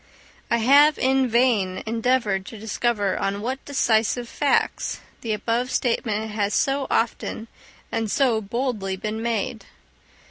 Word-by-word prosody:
I 235 - +3
have 285 +6 +5
in 265 0 +2
vain 225 -6 +1
endeavoured 225 -4 0
to 225 - -8
discover 210 -2 -1
on 195 +1 -1
what 260 +4 -3
decisive 240 -3 +1
facts 285 +4 0 0.2
the 230 - -3
above 230 +4 -1
statement 220 -4 -1
has 210 -1 -1
so 275 0 +1
often 225 0 -1 0.4
and 225 -1 -1
so 240 -2 +2
boldly 215 -3 -2
been 215 +3 -4
made. 230 0 -2
230 Hz, 130 wpm, -23 LUFS, 210-255 Hz, 0.4 s, have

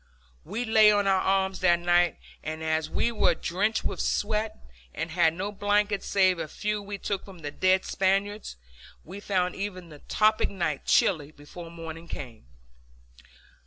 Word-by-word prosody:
We 240 +3 -4
lay 220 -1 +6
on 205 -1 +2
our 190 -1 +3
arms 190 0 +1
that 175 -2 +4
night 175 -1 +2 0.2
and 155 +1 -5
as 160 0 0
we 235 - 0
were 195 -6 +2
drenched 205 +8 -1
with - - -2
sweat, 215 +1 -1 0.4
and 165 - -4
had 165 -1 +3
no 195 +3 -3
blankets 205 0 0
save 185 -3 +3
a 155 - -3
few 210 +6 -3
we 200 0 -6
took 195 0 -3
from 190 -4 -13
the 145 - -4
dead 185 +4 +2
Spaniards, 195 - 0 0.5
we 190 +5 -8
found 185 -3 0
even 185 -3 -6
the 150 -2 -12
tropic 215 0 +3
night 170 -7 -3
chilly 155 -7 +3
before 155 +3 -11
morning 165 0 -8
came. 120 - -8
185 Hz, 160 wpm, -27 LUFS, 165-205 Hz, 0.5 s, lay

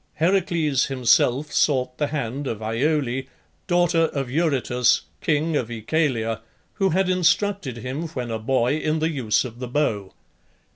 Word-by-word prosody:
Heracles 170 -5 +1
himself 130 +2 +2
sought 130 -3 +1
the 150 - +1
hand 140 -1 -3
of 110 - -3
Iole, 130 +3 0 0.5
daughter 175 -2 +3
of 135 -5 -3
Eurytus, 135 -6 +2 0.2
king 155 +1 +1
of 120 -5 -1
Oechalia, 115 -2 -1 0.3
who 195 -2 +1
had 190 +2 +1
instructed 185 - +1
him 130 +8 -4
when 125 -3 -3
a 110 - -2
boy 130 +4 +1
in 155 0 0
the 160 +1 0
use 130 -6 +1
of 120 -1 -9
the 125 - -4
bow. 115 -8 -1
140 Hz, 145 wpm, -23 LUFS, 120-160 Hz, 0.5 s, daughter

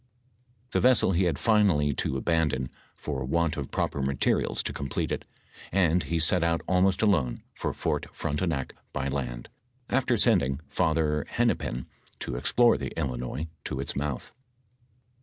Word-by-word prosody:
Tbe - - +1
vessel 125 -6 +4
be 90 +1 +2
had 85 - +1
finally 95 -11 +3
to 65 - -1
abandon 75 -4 0 0.2
for 70 -3 -4
want 85 +4 +1
of 70 -3 -4
proper 70 - -1
materials 65 -1 +1
to - - -3
complete 70 -2 -2
it, - - -3 0.5
and 90 -2 +3
he 85 +3 -1
set 80 +2 +3
out 85 0 +1
almost 95 +2 +3
alone 80 - +2
for - - -2
Fort - - -2
Frontenac 75 -3 -2 0.2
by 70 - -1
land, 60 -3 -3 0.4
after 125 -2 +2
sending 85 - +3
Father 80 -3 +1
Hen - - +2
nepin 60 +1 -2 0.3
to - - -4
explore 120 - +4
tbe - - -5
Illinois 65 +1 -2 0.2
to 65 - -4
its 70 - -3
mouth. 70 -2 -3
75 Hz, 150 wpm, -28 LUFS, 70-90 Hz, 0.5 s, vessel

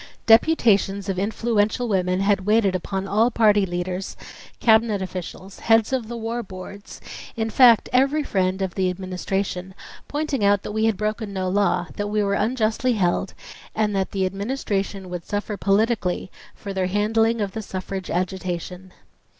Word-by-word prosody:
Deputations 215 - +4
of 185 -1 -1
in 200 +2 0
fluential 225 +1 0
women 185 -3 0
had 195 -1 +2
waited 210 -3 +3
upon 190 +2 -3
all 220 +4 +3
party 210 -4 +3
leaders, 180 +2 -4 0.4
cabinet 220 -2 +4
officials, 185 +1 -7
heads 225 +2 +3
of 250 -4 -1
the 235 +1 -5
war 230 +1 -3
boards, 200 0 -10 0.4
in 225 -1 -2
fact 240 -3 +6
every 275 +4 +3
friend 190 -4 0
of 185 -2 -3
the 185 -1 0
Administration, 185 0 -3 0.3
pointing 295 -5 -2
out 200 -1 +3
that - - -5
we 220 +1 0
had 220 -3 +1
broken 215 +1 -2
no 190 -1 -2
law, 200 +2 +1
that 205 - -2
we 210 0 0
were 200 0 0
unjustly 225 +3 +1
held, 180 -5 0 0.4
and 210 -2 0
that 190 -1 0
.the 190 -1 -1
Administration 195 -1 -3
would 180 -1 -6
suffer 205 +2 -3
politically 200 -2 0 0.2
for 200 -2 -7
their 190 -1 0
handling 225 +4 +1
of 200 -2 -1
the 220 - -5
suffrage 190 -1 -6
agitation. 180 0 -3
200 Hz, 160 wpm, -23 LUFS, 190-225 Hz, 0.4 s, fact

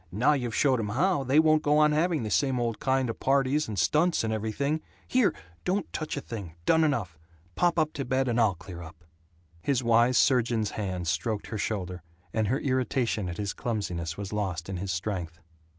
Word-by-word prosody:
Now 125 +11 +3
you've 125 -5 -2
showed 130 -4 +3
'em 105 -2 -2
how, 155 - +1
they 135 +3 +2
won't 155 -1 +5
go 150 0 +3
on 150 0 +5
having 160 -1 +1
the 105 - -4
same 130 +3 +2
old 115 -2 -1
kind 130 -1 +1
of 115 - -5
parties 140 +2 +2
and 105 -2 -5
stunts 155 - +2
and 110 0 -1
everything. 140 +8 -1 0.3
Here! 250 -4 +3 0.3
Don't 190 -1 -1
touch 155 -1 -3
a - - -2
thing! 100 -11 -7
Done 160 0 +4
enough. 105 - -1 0.3
Pop 175 - +1
up 155 -1 +1
to 140 - -3
bed, 130 +1 0
and 120 0 +2
I'll 105 -5 +3
clear 85 0 -10
up." 80 0 -12 0.6
His 130 +2 0
wise 120 +2 +4
surgeon's 120 -5 +2
hands 90 -5 -2
stroked 105 +5 -2
her 110 - -5
shoulder, 90 -4 -3 0.3
and 110 -1 +1
her 130 +6 +1
irritation 130 - 0
at 85 - -6
his 100 -2 -2
clumsiness 90 -8 -3
was 100 0 -5
lost 95 -5 -2
in 95 - -3
his 95 +1 -3
strength. 85 -2 -3
115 Hz, 200 wpm, -28 LUFS, 100-140 Hz, 0.6 s, won't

